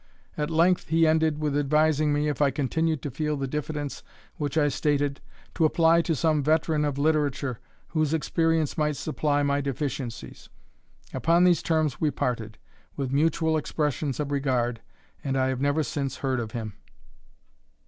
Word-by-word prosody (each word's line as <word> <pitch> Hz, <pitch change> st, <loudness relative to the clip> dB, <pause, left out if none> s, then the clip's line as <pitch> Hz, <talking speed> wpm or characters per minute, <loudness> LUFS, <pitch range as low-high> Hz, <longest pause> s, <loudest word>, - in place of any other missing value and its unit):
At 150 Hz, 0 st, -2 dB
length 170 Hz, +3 st, +2 dB
he 165 Hz, +1 st, +4 dB
ended, 160 Hz, -1 st, +2 dB
with 150 Hz, -2 st, -1 dB
advising 150 Hz, +1 st, +2 dB
me, 145 Hz, +1 st, +1 dB
if 150 Hz, 0 st, -2 dB
I 145 Hz, -, +5 dB
continued 155 Hz, +3 st, -1 dB
to 145 Hz, -, -4 dB
feel 150 Hz, +3 st, -2 dB
the 140 Hz, -, -2 dB
diffidence 150 Hz, +1 st, -4 dB, 0.4 s
which 145 Hz, 0 st, -2 dB
I 150 Hz, -2 st, +4 dB
stated, 145 Hz, -1 st, 0 dB, 0.3 s
to -, -, 0 dB
apply 165 Hz, +1 st, +4 dB
to 165 Hz, -1 st, -1 dB
some 155 Hz, 0 st, +2 dB
veteran 155 Hz, +1 st, +1 dB
of 145 Hz, -2 st, -2 dB
literature, 140 Hz, -4 st, 0 dB, 0.3 s
whose 155 Hz, -3 st, 0 dB
experience 160 Hz, 0 st, 0 dB
might 150 Hz, -1 st, +1 dB
supply 145 Hz, -1 st, 0 dB
my 140 Hz, 0 st, +1 dB
deficiencies. 135 Hz, -3 st, -5 dB, 0.6 s
Upon 170 Hz, +2 st, +3 dB
these 180 Hz, -2 st, +4 dB
terms 155 Hz, -4 st, 0 dB
we 155 Hz, -, +3 dB
parted, 115 Hz, -5 st, -3 dB, 0.4 s
with 135 Hz, -2 st, -3 dB
mutual 160 Hz, +2 st, +2 dB
expressions 150 Hz, -2 st, -2 dB
of 145 Hz, -1 st, -2 dB
regard, 125 Hz, -4 st, 0 dB, 0.4 s
and 135 Hz, -1 st, -1 dB
I 130 Hz, 0 st, +2 dB
have 130 Hz, -1 st, -2 dB
never 145 Hz, +2 st, +2 dB
since 140 Hz, -2 st, -3 dB
heard 130 Hz, -2 st, -1 dB
of 115 Hz, -2 st, -4 dB
him. 110 Hz, -3 st, -4 dB
150 Hz, 160 wpm, -26 LUFS, 140-155 Hz, 0.6 s, I